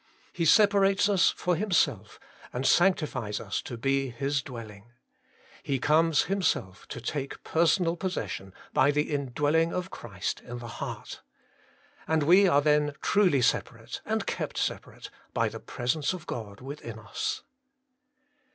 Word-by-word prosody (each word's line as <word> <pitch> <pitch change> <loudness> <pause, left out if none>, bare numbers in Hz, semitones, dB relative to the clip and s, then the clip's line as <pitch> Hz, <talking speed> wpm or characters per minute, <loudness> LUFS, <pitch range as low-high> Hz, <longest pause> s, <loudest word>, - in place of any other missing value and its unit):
He 170 - -1
separates 200 +1 +5
us 200 -3 +4
for 180 -1 0
Himself, 155 - 0 0.3
and 125 +2 -3
sanctifies 150 - +2
us 100 -3 -3
to 120 - -7
be 135 +2 0
His 135 +3 -1
dwelling. 115 -4 -10 0.7
He 140 - -1
comes 155 +3 +3
Him 195 +1 -1
self 95 - -1
to - - -6
take 135 +3 -4
personal 165 +1 +2
possession 175 - -4 0.2
by 140 - +4
the 150 +1 0
indwelling 145 +4 +1
of 180 +1 -3
Christ 100 -6 -4
in 120 0 -7
the 120 -1 -8
heart. 115 - -7 0.9
And 160 -1 +2
we 185 +6 +6
are 145 -5 +4
then 150 -1 +2
truly 180 -11 +3
separate, - - -1
and - - -1
kept - - -3
separate, - - -4 0.2
by - - +2
the - - -8
presence 135 +7 -1
of 180 -2 -8
God 105 -7 -6
within 130 -4 -7
us. 110 -2 -4
145 Hz, 140 wpm, -28 LUFS, 120-170 Hz, 0.9 s, we